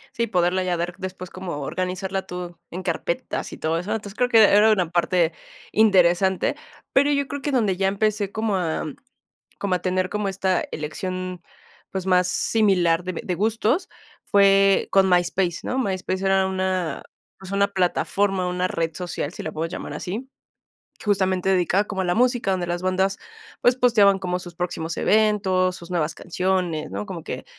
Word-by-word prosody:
Sí, 235 Hz, 0 st, 0 dB
poderla 180 Hz, -2 st, +1 dB
ya 180 Hz, -1 st, 0 dB
dar 175 Hz, +1 st, -2 dB
después 185 Hz, -1 st, -7 dB
como 185 Hz, -5 st, -5 dB
organizarla 185 Hz, +5 st, -3 dB
tú 180 Hz, -1 st, -6 dB
en 185 Hz, +2 st, -6 dB
carpetas 170 Hz, 0 st, -3 dB
y -, -, -8 dB
todo 160 Hz, +1 st, -1 dB
eso. 180 Hz, +4 st, -7 dB
Entonces, 210 Hz, -3 st, -4 dB
creo 245 Hz, +2 st, +1 dB
que 225 Hz, -2 st, +7 dB
e 200 Hz, -, +6 dB
era 215 Hz, +2 st, +6 dB
una 180 Hz, -6 st, +1 dB
parte 175 Hz, -1 st, +2 dB, 0.4 s
interesante, 190 Hz, -3 st, +3 dB, 0.4 s
pero 285 Hz, +2 st, +4 dB
yo 280 Hz, -1 st, +1 dB
creo 285 Hz, 0 st, -5 dB
que 290 Hz, -, -2 dB
donde 215 Hz, -8 st, +1 dB
ya 195 Hz, 0 st, +1 dB
empecé 205 Hz, 0 st, 0 dB
como 220 Hz, -2 st, -1 dB
a 170 Hz, -4 st, -1 dB, 0.7 s
como 195 Hz, -2 st, 0 dB
a -, -, -1 dB
tener 185 Hz, 0 st, 0 dB
como 210 Hz, -1 st, -2 dB
esta 190 Hz, -1 st, 0 dB
elección, 185 Hz, +4 st, -4 dB, 0.5 s
pues, 190 Hz, -1 st, -4 dB
más 180 Hz, -1 st, +4 dB
similar 180 Hz, -4 st, +2 dB
de 185 Hz, -, -3 dB
b -, -, -5 dB
de 180 Hz, -, -2 dB
gustos 225 Hz, -, +1 dB, 0.4 s
fue 195 Hz, -1 st, +4 dB
con 195 Hz, -1 st, +4 dB
MySpace, 175 Hz, -1 st, +1 dB
¿no? 255 Hz, -, -3 dB
MySpace 190 Hz, -5 st, -2 dB
era 195 Hz, 0 st, +3 dB
una 185 Hz, -4 st, -2 dB, 0.3 s
pues, 190 Hz, 0 st, -10 dB
una 200 Hz, 0 st, +2 dB
plataforma, 195 Hz, 0 st, 0 dB
una 180 Hz, 0 st, 0 dB
red 165 Hz, -3 st, -2 dB
social, 175 Hz, -3 st, -4 dB
si -, -, -8 dB
la 155 Hz, -, -4 dB
puedes 165 Hz, +2 st, -3 dB
llamar -, -, -6 dB
así, 220 Hz, +9 st, -5 dB, 0.8 s
justamente 190 Hz, -2 st, +1 dB
dedicada 190 Hz, +1 st, +2 dB
como 195 Hz, -2 st, -3 dB
a -, -, -1 dB
la 175 Hz, 0 st, +1 dB
música, 245 Hz, -3 st, +2 dB
donde 185 Hz, -2 st, 0 dB
las 175 Hz, +1 st, -2 dB
bandas, 190 Hz, +1 st, +1 dB, 0.4 s
pues, 245 Hz, -, +4 dB
posteaban 215 Hz, -6 st, +4 dB
como 180 Hz, -1 st, -2 dB
sus 175 Hz, -2 st, -10 dB
próximos 170 Hz, -2 st, -3 dB
eventos, 195 Hz, -4 st, +2 dB
sus 175 Hz, -1 st, -11 dB
nuevas 165 Hz, -2 st, -1 dB
canciones, 180 Hz, -3 st, -1 dB
¿no? -, -, -4 dB
Como 185 Hz, -6 st, -7 dB
que, -, -, -6 dB
185 Hz, 180 wpm, -23 LUFS, 180-200 Hz, 0.8 s, que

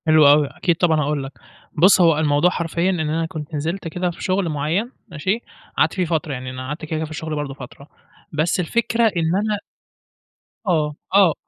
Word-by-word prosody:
حلو 155 Hz, -2 st, +6 dB
أوي، 145 Hz, 0 st, +6 dB
أكيد 170 Hz, +4 st, 0 dB
طبعًا 160 Hz, -2 st, +2 dB
هاقول 145 Hz, -1 st, -1 dB
لك. 135 Hz, -, -7 dB, 0.5 s
بُص، 185 Hz, +4 st, +6 dB
هو 165 Hz, -3 st, +5 dB
الموضوع 150 Hz, +2 st, +3 dB
حرفيًا 170 Hz, 0 st, -1 dB
إن 185 Hz, -2 st, 0 dB
أنا 160 Hz, +1 st, 0 dB
كنت 155 Hz, -1 st, -7 dB
نزلت 165 Hz, +5 st, -3 dB
كده 180 Hz, +2 st, -2 dB
في 170 Hz, -, -10 dB
شغل 185 Hz, -2 st, 0 dB
معيّن 160 Hz, -, -1 dB, 0.2 s
ماشي، 185 Hz, +7 st, -1 dB, 0.4 s
قعدت -, -, +3 dB
فيه 185 Hz, -2 st, 0 dB
فترة 160 Hz, -3 st, -1 dB
يعني 130 Hz, 0 st, -5 dB
أنا 130 Hz, 0 st, -6 dB
قعدت 150 Hz, +3 st, -5 dB
كده -, -, -15 dB
كده 160 Hz, -, -2 dB
في 155 Hz, -, -11 dB
الشغل 155 Hz, 0 st, -4 dB
برضه 145 Hz, -2 st, -3 dB
فترة. 140 Hz, +1 st, -11 dB, 0.5 s
بس 155 Hz, +4 st, +1 dB
الفكرة 230 Hz, +6 st, 0 dB
إن 165 Hz, +1 st, +1 dB
أنا 210 Hz, +1 st, 0 dB, 1.1 s
آه، 155 Hz, -4 st, +1 dB, 0.2 s
آه، 190 Hz, -5 st, +6 dB
160 Hz, 195 wpm, -21 LUFS, 150-180 Hz, 1.1 s, حلو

